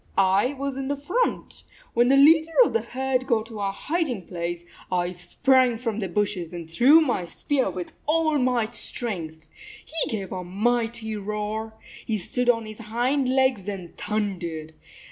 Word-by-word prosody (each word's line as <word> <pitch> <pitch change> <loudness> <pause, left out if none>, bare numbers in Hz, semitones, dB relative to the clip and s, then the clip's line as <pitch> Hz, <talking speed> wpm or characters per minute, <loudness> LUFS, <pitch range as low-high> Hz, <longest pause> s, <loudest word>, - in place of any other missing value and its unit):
" - - -31 0.2
I 255 +5 0
was 275 -1 -4
in 270 0 -3
front. 360 - -1 0.3
When 240 +1 +4
the 270 +2 +5
leader 315 +3 +6
of - - -2
the 230 - +2
herd 260 +2 -2
got 225 -4 +1
to 225 -2 -9
our 200 -1 0
hiding 265 - -2
place, 175 0 -4 0.3
I 175 -1 0
sprang 245 +7 +2
from 225 -2 -3
the 195 - -2
bushes 185 -3 -1
and 170 -2 -6
threw 255 - +6
my 250 - 0
spear 265 +7 -1
with 180 -1 -6
all 310 -1 +3
my 250 -3 +2
strength. 175 -9 -5 0.4
He 325 0 -1
gave 195 -4 -4
a 185 -1 -4
mighty 225 +3 -1
roar. 210 +2 -4 0.3
He 220 - -1
stood 245 +6 -1
on 230 -2 +3
his 215 +1 -9
hind 245 +5 0
legs 260 -6 +2
and 185 -4 -7
thundered. 175 -7 -3
225 Hz, 165 wpm, -25 LUFS, 195-260 Hz, 0.4 s, leader